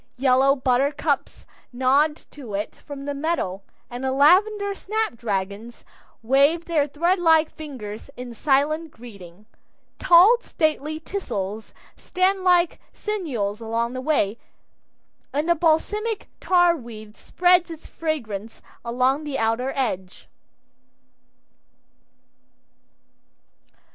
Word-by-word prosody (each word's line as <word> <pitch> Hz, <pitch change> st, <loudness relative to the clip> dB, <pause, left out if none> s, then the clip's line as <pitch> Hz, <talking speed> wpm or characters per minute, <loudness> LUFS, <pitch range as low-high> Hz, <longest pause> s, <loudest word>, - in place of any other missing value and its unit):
Yellow 265 Hz, +1 st, +4 dB
buttercups 280 Hz, +3 st, -1 dB, 0.3 s
nod 270 Hz, +5 st, +2 dB, 0.2 s
to 245 Hz, -9 st, -8 dB
it 205 Hz, +2 st, -4 dB
from 280 Hz, -2 st, -10 dB
the 285 Hz, -, -3 dB
meadow, 280 Hz, -, -2 dB, 0.3 s
and 245 Hz, +2 st, -7 dB
the 265 Hz, -, 0 dB
lavender 400 Hz, +9 st, +3 dB
snap 435 Hz, -, -2 dB
dragons 210 Hz, +1 st, -4 dB, 0.4 s
wave 280 Hz, +7 st, +3 dB
their 310 Hz, -4 st, +1 dB
threadlike 325 Hz, +1 st, +2 dB
fingers 255 Hz, -8 st, -9 dB
in 250 Hz, -1 st, -7 dB
silent 295 Hz, +6 st, +1 dB
greeting. 205 Hz, -, -13 dB, 0.5 s
Tall, 365 Hz, +7 st, +7 dB
stately 310 Hz, -, -1 dB
teasels 220 Hz, -, -5 dB, 0.2 s
stand 375 Hz, +1 st, 0 dB
like 355 Hz, -2 st, +3 dB
sentinels 250 Hz, -, -3 dB
along 230 Hz, +2 st, -2 dB
the 255 Hz, -, -4 dB
way, 240 Hz, -7 st, 0 dB, 0.9 s
and 295 Hz, +3 st, -1 dB
the 345 Hz, -, +5 dB
balsamic 380 Hz, +7 st, 0 dB
tarweed 240 Hz, -, 0 dB
spreads 355 Hz, +3 st, +2 dB
its 325 Hz, -1 st, -10 dB
fragrance 230 Hz, -10 st, -5 dB, 0.2 s
along 255 Hz, +5 st, 0 dB
the 290 Hz, -3 st, -4 dB
outer 225 Hz, +3 st, 0 dB
edge. 190 Hz, -9 st, -3 dB
280 Hz, 100 wpm, -23 LUFS, 235-335 Hz, 0.9 s, Tall